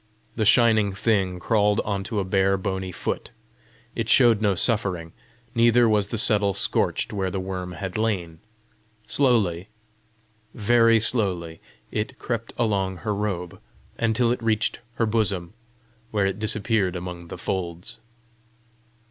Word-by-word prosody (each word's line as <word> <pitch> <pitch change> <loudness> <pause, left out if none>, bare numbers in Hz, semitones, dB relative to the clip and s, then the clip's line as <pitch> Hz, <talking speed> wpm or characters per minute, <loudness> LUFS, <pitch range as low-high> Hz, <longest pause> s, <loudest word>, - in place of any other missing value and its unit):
The 110 - 0
shining 110 -3 +4
thing 95 -3 0
crawled 105 +1 +2
on 100 -2 -3
to 110 -2 -2
a - - 0
bare 95 +1 +1
bony 95 -1 -3
foot: - - -4 0.6
it - - -3
showed 120 -5 +5
no 100 -3 +2
suffering, 90 -6 0 0.4
neither 120 +1 +4
was 105 -2 +2
the 115 - -4
settle 105 -3 +3
scorched 100 - 0
where 95 -2 -1
the 95 - -3
worm 95 -1 -5
had 95 +1 -5
lain. 90 -8 -2 0.7
Slowly, 110 -9 +1 0.9
very 115 +1 +4
slowly, 95 -8 0 0.3
it 105 +1 -3
crept 115 -2 -4
along 95 -5 0
her 105 - 0
robe 100 -4 -4 0.4
until 115 +1 +2
it 120 - -2
reached 110 -1 0 0.2
her 115 - +1
bosom, 100 -5 0 0.6
where 105 -3 0
it 95 +1 -2
disappeared 110 -3 +1
among 90 -1 -7
the - - -8
folds. 90 +5 -4
100 Hz, 135 wpm, -24 LUFS, 95-115 Hz, 0.9 s, showed